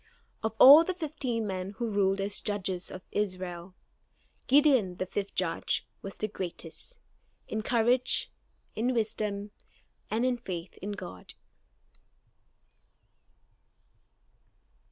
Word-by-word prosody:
Of 220 0 -2
all 285 +7 +10
the 370 +2 -3
fifteen 270 -9 -3
men 190 0 -4
who 235 - -2
ruled 195 -1 +2
as 200 +1 -1
Judges 190 -4 -1
of 185 - -9
Israel, 185 -3 -3 0.7
Gideon, 265 -9 +4
the 185 - -2
fifth 200 +1 -4
Judge, 180 -3 0 0.2
was 195 - -8
the 215 - -1
greatest, 185 - -7 0.5
in 220 - -3
courage, 245 +3 +2 0.4
in 245 +3 0
wisdom, 210 -2 -2 0.6
and 225 +3 0
in 255 -1 +1
faith 185 -6 -6
in 205 +2 -4
God. 90 - -9
205 Hz, 110 wpm, -29 LUFS, 185-240 Hz, 0.7 s, all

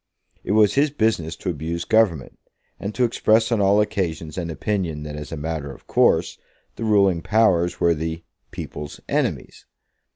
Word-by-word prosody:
It 100 - -1
was 105 -2 +4
his 145 +2 +3
business 110 - 0
to 90 - -3
abuse 85 +2 -4
Government, 100 - +1 0.4
and 100 +2 -5
to 125 - +1
express 115 -1 +2
on 115 -3 +2
all 100 +1 +4
occasions 80 -6 -3
an 85 -2 -4
opinion 85 -3 -2
that 75 -1 -6
as 75 0 -8
a 80 - -4
matter 75 -2 -4
of 65 - -14
course - - +2 0.4
the - - -6
ruling 100 -5 +3
powers 90 -5 +2
were 85 - +3
the 80 +1 -4 0.3
"people's 75 0 -7
enemies." - - -2
85 Hz, 165 wpm, -22 LUFS, 80-105 Hz, 0.4 s, was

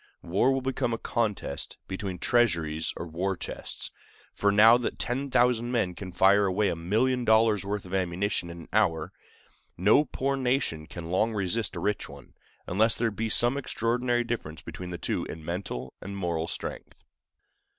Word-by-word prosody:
War 100 +10 +2
will 135 0 0
become 125 -3 0
a - - -6
contest 105 - -2
between 95 -1 -4
treasuries 85 -10 +1
or - - -4
war 90 +3 -2
chests; - - -4 0.4
for 100 - +2
now 110 +3 +8
that 120 -1 -2
10,000 125 -2 +1
men 115 -7 +1
can 90 +1 -8
fire 100 +2 +4
away 100 +2 +1
a - - -1
million 115 +10 +1
dollars' 110 -3 +4
worth 100 0 -3
of 90 - -9
ammunition 95 0 -1
in 85 0 -8
an - - -14
hour, 85 -4 +1 0.6
no 105 - +5
poor 135 +1 -1
nation 125 - 0
can 85 -1 -7
long 110 +4 +1
resist 100 +2 -1
a - - -3
rich 105 +4 -1
one, - - -13 0.3
unless 110 +5 +2
there 115 -1 0
be 110 +2 -2
some 120 +5 +4
extraordinary 120 -2 0
difference 80 -11 -5
between 90 +1 -7
the 90 - -4
two - - -2
in 80 -1 -8
mental 80 -8 -4
and 100 +1 -6
moral 85 -3 -1
strength. - - -7
100 Hz, 170 wpm, -28 LUFS, 85-120 Hz, 0.6 s, now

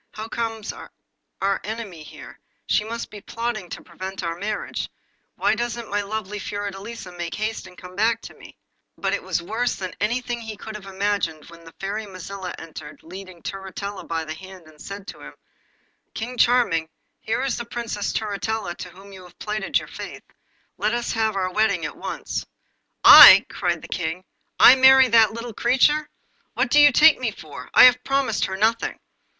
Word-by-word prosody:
'How 215 +1 -6
comes 225 -2 -4
our 195 0 -6
enemy 210 -6 -6
here? 155 - -12 0.3
She - - +1
must 230 +2 -6
be 210 - -10
plotting 230 -4 -4
to - - -8
prevent 185 +2 -7
our 170 -1 -2
marriage. 205 +4 -4 0.5
Why - - +1
doesn't 235 0 -4
my 205 0 +1
lovely 210 0 -5
Fiordelisa 205 0 -6
make 175 -1 -5
haste 215 -1 -4
and 180 - -16
come 180 0 -12
hack 225 +1 +2
to - - -10
me?' - - -15 0.4
But - - -1
it - - -1
was 170 - -2
worse 230 +7 -1
than 185 -2 -6
anything 240 +3 -2
he 220 -2 -7
had 215 -2 -8
imagined 190 -5 -2
when 170 0 -14
the 165 - -13
Fairy 205 +2 -5
Mazilla 185 -1 -7
entered, 160 -2 -10
leading 185 0 -11
Turritella 195 0 -6
by 165 -1 -3
the 155 - -5
hand, 185 +1 -12
and 155 -1 -18
said 200 0 -8
to - - -10
him - - -10 0.8
'King 240 +3 -5
Charming, 230 -11 +3 0.3
here 225 +4 -2
is 270 - -1
the 235 - -5
Princess 230 -3 -4
Turritella 215 -2 -3
to 180 - -7
whom 195 +3 -15
you 190 - -11
have 180 -1 -16
plighted 210 -2 -1
your - - -5
faith. - - -9 0.6
Let 215 +3 +1
us 240 0 -2
have 220 -2 0
the 185 -1 -1
wedding 200 -6 +1
at - - -6
once.' - - -5 0.6
'I!' - - +11
cried - - -2
the - - -8
King. 165 +3 -3 0.4
'I 260 - +9
marry 265 0 +7
that 225 -1 +5
little 230 0 -7
creature! 290 +7 +2 0.5
What 245 -1 0
do 295 - +6
you 290 0 +8
take 305 +4 +6
me 250 -3 -1
for? 145 -10 -10
I - - +9
have 250 0 +7
promised 270 -5 0
her 190 - -4
nothing! 225 +3 0
210 Hz, 180 wpm, -23 LUFS, 185-230 Hz, 0.8 s, I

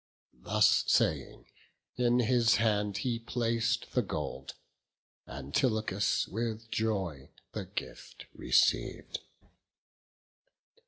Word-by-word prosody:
Thus - - +4
saying, - - +1 0.5
in 120 0 +3
his 120 -1 +3
hand 105 -3 +1
he 115 +2 -1
plac'd 115 0 -1
the 125 - +3
gold; 75 - -5 0.7
Antilochus 100 - 0
with 115 +1 -4
joy 95 -11 -2 0.2
the 105 -3 -5
gift 95 +3 -8
receiv'd. - - +1
110 Hz, 85 wpm, -31 LUFS, 95-115 Hz, 0.7 s, Thus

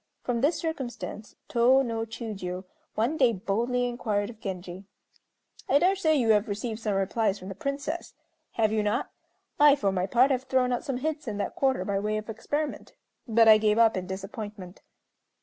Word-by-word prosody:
From 240 -2 -1
this 295 +5 +2
circumstance 255 -8 -5
Tô 255 +3 +4
no 225 -1 -3
Chiûjiô 200 -6 -5 0.3
one 240 +9 0
day 250 -5 +4
boldly 235 +5 -1
inquired 220 -3 -2
of 225 - -17
Genji: 185 -1 -6 0.8
"I - - +5
dare 365 +6 +3
say 315 -5 +2
you 240 -6 +1
have 210 +1 +3
received 220 +2 -4
some 215 -3 -1
replies 200 +1 0
from 185 - -9
the - - -5
Princess. 280 - -4 0.4
Have 220 -2 +2
you 215 -1 +1
not? 210 +4 -1 0.5
I 295 -1 +7
for 200 -8 0
my 185 0 -1
part 250 +6 +4
have 260 0 0
thrown 255 -1 +1
out 245 - -2
some 270 -3 -2
hints 305 +1 -3
in 210 -2 -3
that 205 - -3
quarter 265 -1 +1
by 200 -2 0
way 210 +1 -1
of 215 +1 -5
experiment, 290 +7 -4 0.3
but 225 0 +4
I 215 -1 +8
gave 210 0 +2
up 230 -1 +5
in 185 -1 -4
disappointment." 195 -1 -7
225 Hz, 185 wpm, -27 LUFS, 205-260 Hz, 0.8 s, I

